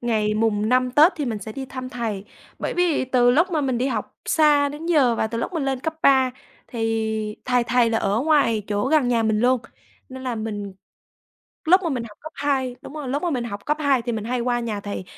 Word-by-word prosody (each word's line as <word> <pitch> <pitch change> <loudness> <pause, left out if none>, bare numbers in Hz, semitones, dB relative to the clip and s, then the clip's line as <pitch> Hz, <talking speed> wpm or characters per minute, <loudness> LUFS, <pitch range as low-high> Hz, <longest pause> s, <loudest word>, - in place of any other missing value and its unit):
ngày 215 -3 0
mùng 215 -1 +1
5 255 +1 +2
Tết 305 +8 +6
thì 295 - -2
mình 230 -4 -3
sẽ 210 +2 -8
đi 265 +3 -6
thăm 255 0 -6
thầy, 225 -6 -4 0.3
bởi - - -3
vì 355 -6 +2
từ 250 -1 +3
lúc 335 +9 +3
mà 315 -3 0
mình 260 -4 -1
đi 255 - 0
học 265 - -3
xa 295 -2 +3
đến 295 +3 -7
giờ 285 -8 +3
và 220 - 0
từ 230 +1 -4
lúc 235 - -3
mình 320 -5 -2
lên 270 -2 -1
cấp 320 +3 -3
3 265 -2 +5 0.4
thì 220 -2 -2
thầy 250 -1 +2
thầy 240 -1 +2
là 225 - +1
ở 205 +2 0
ngoài 280 -7 +2
chỗ 205 +4 -1
gần 300 -4 +3
nhà 235 -2 +2
mình 220 -1 +1
luôn 250 0 +3 0.5
nên 260 0 -9
là 250 -2 -2
mình 210 -3 -5 0.9
lúc 365 +4 +5
mà 340 - -1
mình 250 -3 -2
học 210 -3 -13
cấp 315 +1 -9
2, 270 -3 -1
đúng - - -10
rồi, 295 -4 -5
lúc 285 +3 -2
mà 350 - 0
mình 250 -5 -2
học 205 -3 -7
cấp 300 0 +1
2 275 -4 +2
thì 240 0 -3
mình 215 -2 -3
hay 245 +1 -2
qua 240 0 0
nhà 220 -3 -3
thầy 200 -2 -5
250 Hz, 245 wpm, -23 LUFS, 225-280 Hz, 0.9 s, Tết